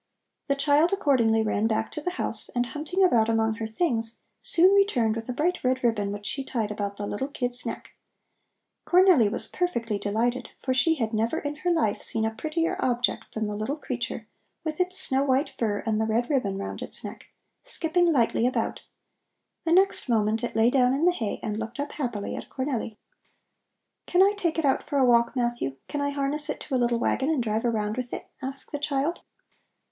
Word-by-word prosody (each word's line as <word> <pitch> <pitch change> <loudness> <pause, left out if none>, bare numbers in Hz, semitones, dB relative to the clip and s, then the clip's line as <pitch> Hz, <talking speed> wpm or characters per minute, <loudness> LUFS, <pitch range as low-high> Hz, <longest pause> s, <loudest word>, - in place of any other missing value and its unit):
The 280 - +2
child 290 +4 +3
accordingly 245 - +3
ran 215 0 +1
back 220 0 -1
to 300 - -5
the 360 - -1
house, - - -2
and 245 0 +2
hunting 310 +9 -1
about 230 -11 +4
among 225 -1 +2
her 225 - -3
things, 225 -3 0 0.2
soon 365 +3 +4
returned 255 - +3
with 230 +1 -6
a - - +1
bright 330 +8 -1
red 255 0 +1
ribbon 210 -4 +1
which 205 0 -7
she 275 +6 -2
tied 225 -5 -2
about 205 -1 -4
the 205 - -4
little 205 +6 -3
kid's 250 -4 -3
neck. - - -6 0.9
Cornelli 355 - +5
was - - -2
perfectly 235 - -2
delighted, 230 +4 -1
for 260 - -1
she 320 +6 +3
had 225 -6 -2
never 225 +8 0
in 295 -1 -4
her 355 +3 -1
life 320 -12 +1
seen 220 -1 -2
a 220 - -1
prettier 315 +7 -1
object 245 0 -1
than 220 0 -1
the 210 0 -3
little 215 +7 -2
creature 240 -5 -4 0.4
with 315 0 -4
its 365 +1 +3
snow 265 +1 +5
white 270 +1 +1
fur 210 -3 -1
and 220 -1 0
the 220 - 0
red 235 +5 0
ribbon 205 -9 0
round 195 - -5
its - - -6
neck, - - -8 0.4
skipping 350 -7 +1
lightly 240 -3 +2
about. 255 - -1 0.9
The 330 - 0
next 375 -5 +3
moment 220 0 +1
it 240 - -3
lay 225 +2 +4
down 255 -1 +3
in 300 +5 +1
the 360 - +6
hay 225 -12 -3
and 215 0 -3
looked 225 +4 -6
up 290 0 -3
happily 240 -8 -3
at - - -7
Cornelli. 255 -5 -3 1.1
"Can 360 +1 +5
I 400 +1 +4
take 340 -5 -1
it 325 - +1
out 270 - +2
for 290 - -3
a 265 - +5
walk, 235 0 +3
Matthew? 240 - -1
Can 290 - -3
I 285 - 0
harness 285 +2 -2
it 295 - -3
to 290 - -7
a - - +3
little 240 0 +2
wagon 265 +4 0
and 300 -6 +1
drive 220 +1 -1
around 215 -1 -1
with 250 -1 -4
it?" - - -7
asked 270 +1 -4
the 290 - -3
child. 290 +3 -1
250 Hz, 205 wpm, -26 LUFS, 225-300 Hz, 1.1 s, the